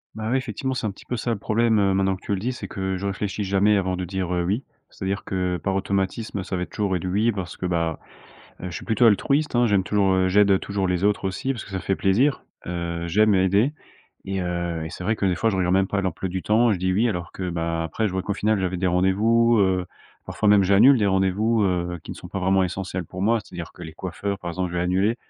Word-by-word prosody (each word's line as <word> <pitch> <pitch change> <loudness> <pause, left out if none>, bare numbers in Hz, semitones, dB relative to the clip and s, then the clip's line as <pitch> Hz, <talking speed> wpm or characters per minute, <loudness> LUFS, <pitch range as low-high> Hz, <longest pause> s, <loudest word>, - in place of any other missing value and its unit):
Bah, 110 0 -4
oui, 130 - +2
effectivement, 130 +1 -3
c'est 120 - -3
un 105 - -1
petit - - -16
peu 125 - -3
ça 120 +1 -2
le 110 - -1
problème 110 -2 +2
maintenant 95 0 +1
que - - -23
tu - - -1
le 95 - -1
dis, 120 +5 -1
c'est 110 -6 -7
que 95 0 -3
je 100 - -5
réfléchis 100 +1 -3
jamais 100 +2 +3
avant 95 -1 0
de 90 - -4
dire: 95 0 -3
«Oui». 90 +8 0 0.3
C'est-à-dire 100 0 -4
que 90 -1 -1
par 95 +2 -2
automatisme, 100 +1 -2
ça 95 - -3
va 90 - -1
être - - -9
toujours 100 -3 0
et - - -5
du 90 - -5
«oui» 105 +6 +2
parce 95 -5 -5
que, - - -5
bah, 85 -2 0 0.6
je 90 - -6
suis - - -7
plutôt 110 +1 +2
altruiste, 140 +9 +2
hein. 120 0 +4
J'aime 100 -3 +2
toujours 95 -2 +2
j'aide 100 0 +4
toujours 100 -2 -2
les 90 +1 0
autres 105 -1 +1
aussi 130 +8 -2
parce 120 - -7
que - - -13
ça 95 - -3
fait 95 - -1
plaisir, 120 +11 +2 0.2
heu, 85 -1 -3
j'aime 105 +5 +3
aider 100 +9 +3 0.5
et 95 0 -2
heu 85 -2 -2
et 80 - -6
c'est 90 - -8
vrai 110 +4 +1
que 105 - -3
des 90 -2 +1
fois, 115 -1 +1
je 95 - -2
regarde 90 0 +1
même 95 0 +3
pas 100 0 -1
l'emploi 95 0 -3
du 95 0 -4
temps 115 +3 +3
et - - +2
je 90 - -4
dis: 95 0 +1
«Oui», 110 +6 +2
alors 90 -4 -3
que, 95 -1 -5
bah, 85 0 -2
après, 105 +6 -1
je - - -6
vois 95 0 -1
qu'au 100 - -2
final, 105 +1 +1
j'avais 95 -1 -1
des 90 +1 0
rendez-vous, 110 +6 +3
heu, 95 -2 +1 0.4
parfois 105 - 0
même, 100 -2 +6
j'annule 105 +8 +6
des 105 - +2
rendez-vous, 100 +4 +2
heu, 90 -3 -1
qui - - -9
ne - - -7
sont - - -10
pas 100 - -5
vraiment 95 +1 +3
essentiels 90 0 -4
pour 95 +4 -7
moi. 115 +2 +3
C'est-à-dire 85 -5 -8
que 90 - -10
les 80 - -8
coiffeurs, 95 +4 -4
par 85 - -4
exemple, 90 0 -3
je - - -3
vais - - +1
annuler 95 +6 +1
95 Hz, 265 wpm, -24 LUFS, 90-105 Hz, 0.6 s, même